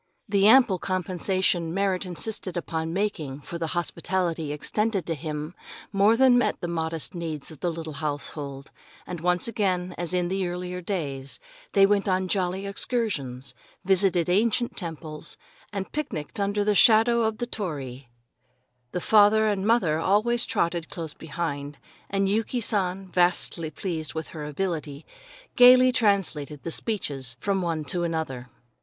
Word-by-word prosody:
The 200 -1 +4
ample 225 -6 +6
compensation 185 -2 -1
Merrit 195 -1 0
insisted 180 +1 -3
upon 160 -1 -3
making 165 -8 -2
for 170 +4 -7
the 165 - -1
hospitality 170 -2 -1
extended 205 +6 -1
to 165 - -1
him 150 +1 -5 0.4
more 205 +3 +4
than 255 -1 +6
met - - 0
the 175 - -3
modest 165 0 -3
needs 165 -4 -4
of 155 - -12
the 175 - -1
little 160 -1 -6
household, 145 -2 -5 0.3
and 175 -3 -6
once 180 +2 +1
again, 185 -6 -1
as 175 -1 0
in 180 -1 +1
the 190 0 -1
earlier 180 +1 -4
days, 140 -8 -3 0.3
they 195 -1 +7
went 200 0 +2
on 185 0 +1
jolly 185 0 0
excursions, 150 - -1 0.3
visited 185 -2 +4
ancient 225 +6 +1
temples, 160 -4 -6 0.3
and 195 -2 -4
picnicked 205 - -4
under 205 +1 +1
the 210 0 +2
shadow 230 +3 +6
of 220 -1 0
the 240 - -2
torii. 140 - -5 0.8
The 180 - -2
father 215 +2 +5
and 205 -2 0
mother 185 -10 +3
always 220 +7 +2
trotted 170 -1 -1
close 165 -3 -6
behind, 145 -3 -5 0.3
and 195 0 +1
Yuki 220 +5 0
San, 195 -4 0
vastly 175 -2 +2
pleased 160 -3 -4
with 160 0 -4
her 155 -2 -7
ability, 150 -2 -3 0.5
gaily 255 +1 +8
translated 185 - 0
the 165 - -4
speeches 140 - -2
from 195 -1 0
one 165 -3 -2
to 175 +4 -1
another. 155 -7 -3
180 Hz, 150 wpm, -26 LUFS, 160-200 Hz, 0.8 s, gaily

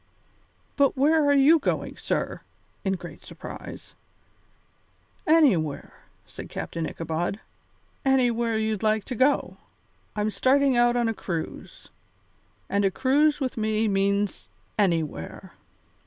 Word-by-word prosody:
"But 280 -1 +3
where 305 +3 +4
are 285 - +5
you 290 +4 +6
going, - - -2
sir?" - - -2 0.4
in 190 - 0
great 175 -2 -8
surprise. - - -10 1.3
"Anywhere," 245 - +3 0.3
said - - -10
Captain 165 -1 -4
Ichabod, 165 +4 -3 0.6
"anywhere 240 -4 +2
you'd 220 -2 -1
like 215 -1 +1
to 250 - -5
go. 265 +5 +1 0.6
I'm 210 0 0
starting 270 +3 +3
out 240 0 +4
on 240 -1 +2
a 225 - 0
cruise, 170 -6 -6 0.8
and 200 0 0
a 195 - +4
cruise 285 +7 +2
with 260 -4 -3
me 220 0 +1
means 200 0 0 0.3
anywhere. 165 - -1
220 Hz, 115 wpm, -25 LUFS, 195-270 Hz, 1.3 s, you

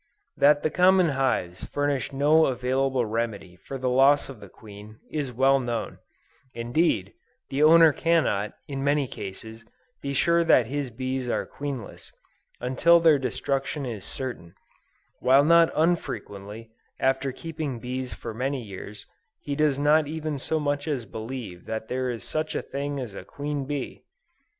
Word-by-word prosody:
That 145 +1 +4
the 155 - +1
common 185 -1 +4
hives 130 -10 -1
furnish 145 -2 -1
no 150 +4 +4
available 130 0 0
remedy 105 -5 -3
for 100 +9 -8
the 130 0 -2
loss 135 +4 +4
of 130 -5 -9
the 100 -2 -12
queen, 105 +1 -13
is 145 -4 -2
well 135 +3 +3
known: 120 -3 -4 0.6
indeed, 120 - 0 0.4
the 135 +2 -1
owner 160 0 +7
cannot, 140 -12 +1
in 135 -1 -4
many 145 -1 +2
cases, 110 +2 -8 0.4
be 140 0 -3
sure 170 +4 +3
that 130 -7 +5
his 140 +2 -3
bees 130 +1 -3
are - - -1
queenless, 140 -6 -7 0.5
until 130 +7 +4
their 160 -4 +5
destruction 135 +2 -2
is 115 -6 -5
certain, 120 -10 -6 0.6
while 135 +2 +5
not 170 +2 +6
unfrequently, 110 - -2 0.3
after 135 +1 +1
keeping 155 -2 -5
bees 125 +1 -4
for 115 - -7
many 130 +2 -2
years, 100 0 -9 0.4
he 145 - -4
does 150 -2 +2
not 150 +1 +4
even 155 -1 -4
so 160 +4 -1
much 145 0 -1
as 135 -6 -2
believe 110 -4 -7
that 110 0 -5
there 130 0 -1
is 120 -2 -4
such 155 0 -3
a - - -2
thing 140 0 -4
as 120 -6 -6
a - - -8
queen 145 -1 -4
bee! 140 -2 -5
135 Hz, 155 wpm, -26 LUFS, 115-145 Hz, 0.6 s, owner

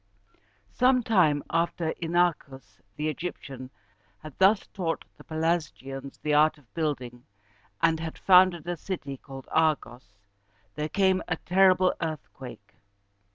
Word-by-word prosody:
Some 255 0 +3
time 160 -10 +3
after 165 -1 0
Inachus 165 - -1
the 150 - -2
Egyptian 140 -5 -6 0.5
had 155 -2 -9
thus 195 +2 +4
taught 170 -5 -4
the - - -12
Pelasgians 150 -4 -3
the 150 - 0
art 155 +1 +4
of 140 -6 -25
building, 130 -7 -3 0.6
and 165 -1 +3
had 160 0 -6
founded 180 -3 +5
a 175 -1 -2
city 145 -7 -5
called 135 0 -11
Ar´gos, 130 -9 0 0.6
there 150 +1 -3
came 190 +2 +2
a - - 0
terrible 185 0 +3
earthquake. 135 -9 -7
160 Hz, 120 wpm, -27 LUFS, 140-180 Hz, 0.6 s, founded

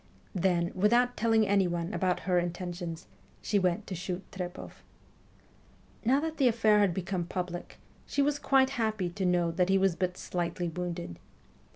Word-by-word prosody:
Then, 175 -2 +1
without 240 +6 +3
telling 225 -1 +3
anyone 180 -2 +1
about 185 -2 0
her 180 +1 +2
intentions, 175 -1 -4 0.3
she 205 - +1
went 185 +2 0
to - - -6
shoot 180 +1 -4
Trepoff. 180 -2 -7 1.2
Now 255 +4 +3
that 320 0 -3
the 270 - +4
affair 220 -3 +4
had 200 -3 +4
become 180 0 -2
public, 175 0 -5 0.3
she 285 - +1
was 290 0 +1
quite 265 -1 +3
happy 215 -5 0
to 190 +2 -3
know 175 -1 +2
that 180 +2 +1
he 195 - +4
was 190 -2 +2
but 180 0 -2
slightly 175 0 -2
wounded. 175 - -5
185 Hz, 160 wpm, -30 LUFS, 175-215 Hz, 1.2 s, the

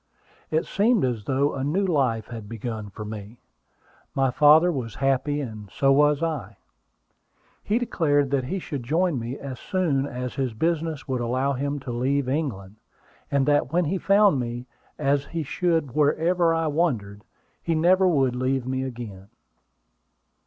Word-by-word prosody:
It 160 +2 0
seemed 215 - +2
as 115 -5 -3
though 140 +2 +1
a 135 - -3
new 175 +8 +1
life 130 - +1
had 110 -3 -8
begun 110 -2 -5
for 105 +2 -8
me. 105 +1 -8 0.8
My 135 -1 +2
father 155 +6 +6
was 120 - -4
happy, 135 +2 0
and 110 -6 -7
so 135 +7 +2
was 150 +2 +4
I. 125 -12 -3 1.0
He 210 - 0
declared 145 - +1
that 135 -2 +1
he 185 +9 -2
should 150 -7 -5
join 160 +3 0
me 120 +4 -5
as 135 -3 -7
soon 150 -8 0
as 125 -1 -5
his 130 -4 -2
business 160 +2 -1
would 130 -2 -1
allow 130 +4 0
him 140 +2 -2
to 130 - -6
leave 130 +3 0
England; 115 -9 -3 0.5
and 140 -1 +2
that 145 -2 +2
when 175 +1 +2
he 185 +5 -1
found 200 -6 +4
me, 120 0 -4 0.3
as 140 -1 +1
he 165 +1 -4
should 165 -1 0
wherever 165 +5 +2
I 165 0 +1
wandered, 125 -11 -1 0.4
he 165 - -1
never 185 +4 +4
would 135 -7 +2
leave 130 0 0
me 130 0 -2
again. 115 -7 -7
140 Hz, 160 wpm, -25 LUFS, 120-160 Hz, 1.0 s, father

